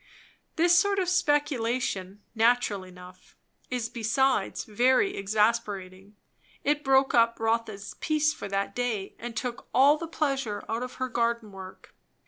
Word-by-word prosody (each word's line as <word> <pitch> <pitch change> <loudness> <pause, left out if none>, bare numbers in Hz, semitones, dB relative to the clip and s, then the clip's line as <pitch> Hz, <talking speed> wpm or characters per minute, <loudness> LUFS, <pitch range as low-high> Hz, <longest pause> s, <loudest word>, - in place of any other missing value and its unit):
This 345 +1 +5
sort 400 +1 +1
of 375 -2 0
speculation, 255 - 0
natural 230 -3 +2
enough, 180 0 -15 0.3
is 245 -2 -2
besides 235 0 0
very 255 - +2
exasperating. 205 -2 -1 0.5
It 295 +1 +1
broke 270 0 +3
up 230 -1 +3
Rotha's 225 -3 -2
peace 305 -1 +1
for 200 - -7
that 195 0 -2
day 225 -5 -2
and 235 -1 -7
took 240 +1 -4
all 285 +3 +6
the 330 - -5
pleasure 275 -9 -2
out 225 +1 -2
of 250 0 -5
her 255 - -2
garden 235 -3 -1
work. 190 -1 -12
235 Hz, 135 wpm, -27 LUFS, 205-270 Hz, 0.5 s, all